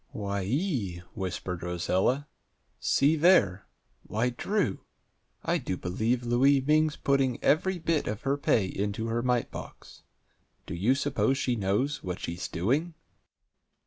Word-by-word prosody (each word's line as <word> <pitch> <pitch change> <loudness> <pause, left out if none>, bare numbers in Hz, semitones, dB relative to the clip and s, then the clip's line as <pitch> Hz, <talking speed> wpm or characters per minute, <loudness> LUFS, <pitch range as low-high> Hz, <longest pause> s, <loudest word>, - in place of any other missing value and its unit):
"Why 100 -2 -2
ee!" 115 - -1
whispered 90 -2 -4
Rosella. 90 - 0 0.5
"See 145 +4 +3
there! 145 - +4 0.3
Why, 115 +4 -1
Drew! 150 - -1 0.6
I - - +1
do 95 - -3
believe 110 +8 -1
Louie 135 +4 +4
Ming's 155 +3 +2
putting 135 -3 +1
every 185 +5 +2
bit 165 -2 0
of 105 0 -4
her 140 +1 +1
pay 120 -7 +2
into 105 +4 -3
her 115 +1 0
mite 125 -1 0
box! - - -10 0.6
Do - - -6
you 105 +10 +2
suppose 135 -1 +1
she 125 -3 0
knows 110 +8 0
what 90 -1 -4
she's 85 +2 -4
doing?" 140 - -1
120 Hz, 135 wpm, -28 LUFS, 95-140 Hz, 0.6 s, there